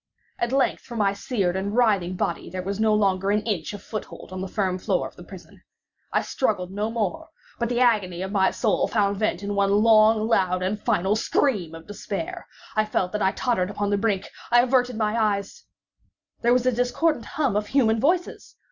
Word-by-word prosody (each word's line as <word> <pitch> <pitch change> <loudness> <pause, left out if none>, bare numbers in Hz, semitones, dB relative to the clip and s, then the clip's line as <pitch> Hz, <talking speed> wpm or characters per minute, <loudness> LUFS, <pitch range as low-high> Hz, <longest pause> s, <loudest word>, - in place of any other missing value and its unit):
At 235 - -1
length 270 -1 +1
for 240 - -10
my 200 -3 +2
seared 200 -3 -1
and 200 +2 -2
writhing 200 -7 +2
body 170 -1 -2
there 185 +1 -5
was 200 +2 -4
no 220 0 +3
longer 195 -2 +2
an 210 +1 +1
inch 205 -8 -2
of 205 - -9
foothold 215 -3 -7
on 185 0 -5
the 190 - -3
firm 185 -2 -1
floor - - 0
of - - -16
the - - -12
prison. - - -13 0.5
I - - +1
struggled 190 -8 -1
no 205 +3 -2
more, 280 +9 -3 0.3
but 235 -1 -1
the 245 0 0
agony 195 -7 +2
of 190 - -5
my 195 -2 +3
soul - - 0
found 200 -2 +1
vent 205 -3 -1
in 205 0 -2
one 200 0 +2
loud, 215 +1 +5
long, 185 -5 +1
and 205 +3 -2
final 205 -3 +1
scream 210 - 0
of 165 0 -11
despair. 325 - -6 0.3
I 215 - +3
felt 190 -4 -1
that 210 - -3
I 190 - +3
tottered 205 -7 0
upon 205 0 -2
the 205 - +2
brink—I 220 +3 +1
averted 250 -2 +1
my 215 0 0
eyes— 205 -3 -1 0.8
There 235 - +3
was 250 0 +3
a 255 - +4
discordant 245 +3 0
hum 275 -9 +1
of 210 0 0
human 225 -4 +2
voices! 350 +8 -1
210 Hz, 200 wpm, -24 LUFS, 195-235 Hz, 0.8 s, loud